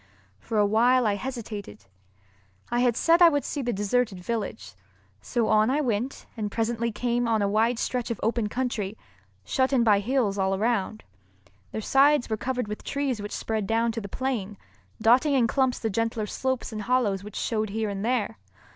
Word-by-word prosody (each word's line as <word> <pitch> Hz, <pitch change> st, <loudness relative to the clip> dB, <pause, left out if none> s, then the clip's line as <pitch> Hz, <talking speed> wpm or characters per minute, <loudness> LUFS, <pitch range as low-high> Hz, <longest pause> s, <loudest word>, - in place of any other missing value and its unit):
For 220 Hz, -, -4 dB
a 205 Hz, -, +5 dB
while 240 Hz, +4 st, +3 dB
I 210 Hz, -, +2 dB
hesitated. 205 Hz, -, -6 dB, 0.9 s
I 240 Hz, -, +1 dB
had 245 Hz, -2 st, +2 dB
said 335 Hz, +1 st, +4 dB
I 345 Hz, -, +9 dB
would 290 Hz, -3 st, -1 dB
see 290 Hz, -, -3 dB
the 245 Hz, -2 st, -1 dB
deserted 205 Hz, 0 st, 0 dB
village, 205 Hz, -, -4 dB, 0.5 s
so 235 Hz, -3 st, -1 dB
on 215 Hz, +1 st, +4 dB
I 280 Hz, +3 st, +1 dB
went 245 Hz, -1 st, -2 dB
and 215 Hz, -3 st, -3 dB
presently 230 Hz, +1 st, -1 dB
came 240 Hz, +2 st, -1 dB
on 220 Hz, -2 st, +2 dB
a -, -, +2 dB
wide 225 Hz, +4 st, +2 dB
stretch 245 Hz, 0 st, -2 dB
of 235 Hz, -, -3 dB
open 225 Hz, -1 st, 0 dB
country, 220 Hz, -4 st, -2 dB, 0.5 s
shut 260 Hz, 0 st, +1 dB
in 255 Hz, -4 st, +3 dB
by 210 Hz, -3 st, +4 dB
hills 215 Hz, -2 st, 0 dB
all 190 Hz, 0 st, +1 dB
around. 215 Hz, 0 st, -1 dB, 0.7 s
Their 220 Hz, -, -4 dB
sides 275 Hz, +1 st, +3 dB
were -, -, +2 dB
covered 250 Hz, +1 st, -3 dB
with 210 Hz, 0 st, -6 dB
trees 275 Hz, -6 st, -2 dB
which 205 Hz, -, -6 dB
spread 220 Hz, -3 st, -2 dB
down 230 Hz, +1 st, +1 dB
to 225 Hz, 0 st, -4 dB
the 200 Hz, -, -8 dB
plain, 215 Hz, -5 st, -3 dB, 0.4 s
dotting 260 Hz, +5 st, +4 dB
in 250 Hz, -3 st, +4 dB
clumps 260 Hz, +2 st, +1 dB
the 225 Hz, -, -2 dB
gentler 225 Hz, +1 st, -1 dB
slopes 260 Hz, +4 st, -2 dB
and 215 Hz, -1 st, -4 dB
hollows 210 Hz, -4 st, +1 dB
which 210 Hz, 0 st, -10 dB
showed 215 Hz, -2 st, -1 dB
here 220 Hz, +1 st, -2 dB
and 200 Hz, 0 st, -4 dB
there. 225 Hz, -2 st, -1 dB
230 Hz, 190 wpm, -26 LUFS, 210-250 Hz, 0.9 s, I